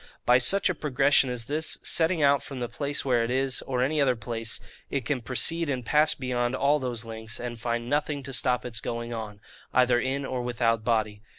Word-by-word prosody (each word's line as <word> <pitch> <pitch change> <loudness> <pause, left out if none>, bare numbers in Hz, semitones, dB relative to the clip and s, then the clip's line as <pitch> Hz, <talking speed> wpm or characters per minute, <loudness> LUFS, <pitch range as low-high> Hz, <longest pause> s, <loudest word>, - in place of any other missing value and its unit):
By 125 +1 +6
such 195 +10 +4
a 185 - +1
progression 140 -3 +2
as 125 -2 -4
this, 155 +4 -1
setting 165 -1 +1
out 140 0 +4
from 135 - -7
the 120 -1 -2
place 140 +4 -3
where 120 -3 +2
it 115 - -2
is, 130 +1 0
or 125 -1 0
any 150 +3 +1
other 130 -3 +3
place, 115 -1 -4 0.3
it 135 -4 -2
can 135 -1 -1
proceed 155 +7 +1
and 125 -3 -2
pass 150 +3 +4
beyond 125 -1 -1
all 145 +3 +2
those 120 -4 -4
lengths, 110 -1 -5
and 120 -2 -6
find 120 0 -2
nothing 145 0 -1
to 135 +1 -7
stop 125 -1 +1
its 115 -2 -4
going 115 0 -4
on, 105 -3 -6 0.4
either 125 -1 +4
in 135 +3 -2
or 130 -2 -3
without 115 -2 0
body. 110 -3 0
125 Hz, 210 wpm, -27 LUFS, 120-140 Hz, 0.4 s, By